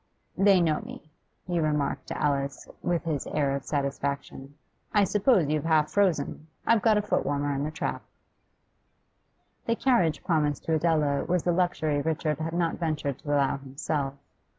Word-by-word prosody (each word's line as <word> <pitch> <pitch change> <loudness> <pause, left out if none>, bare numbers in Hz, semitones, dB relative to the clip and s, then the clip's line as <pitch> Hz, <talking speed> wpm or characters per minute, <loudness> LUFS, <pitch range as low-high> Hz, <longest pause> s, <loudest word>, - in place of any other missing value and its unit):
'They 195 -1 +5
know 160 -3 +1
me,' 230 -9 -11 0.3
he 175 -1 -1
remarked 150 -3 -1
to - - -4
Alice, 140 -1 -1
with 175 -1 0
his 155 -5 -2
air 140 -2 0
of 140 - -4
satisfaction. 140 -1 -3 0.4
'I 205 - +6
suppose 200 - +3
you're 155 0 0
half 155 -1 +2
frozen? 165 -6 0 0.2
I've 230 -2 +4
got 220 -1 +4
a 210 - +1
foot 210 - 0
warmer 145 0 -1
in 140 0 -2
the - - -2
trap.' 155 +1 -3 1.7
The 230 - +2
carriage 230 - +2
promised 150 -4 0
to 165 - -1
Adela 155 -3 +1
was 180 -1 0
a 175 - +3
luxury 170 -4 +1
Richard 155 -1 -1
had 160 +1 -3
not 170 -1 0
ventured 150 -5 -2
to - - -17
allow 140 -2 +2
himself. 135 +1 -3
155 Hz, 165 wpm, -27 LUFS, 140-175 Hz, 1.7 s, I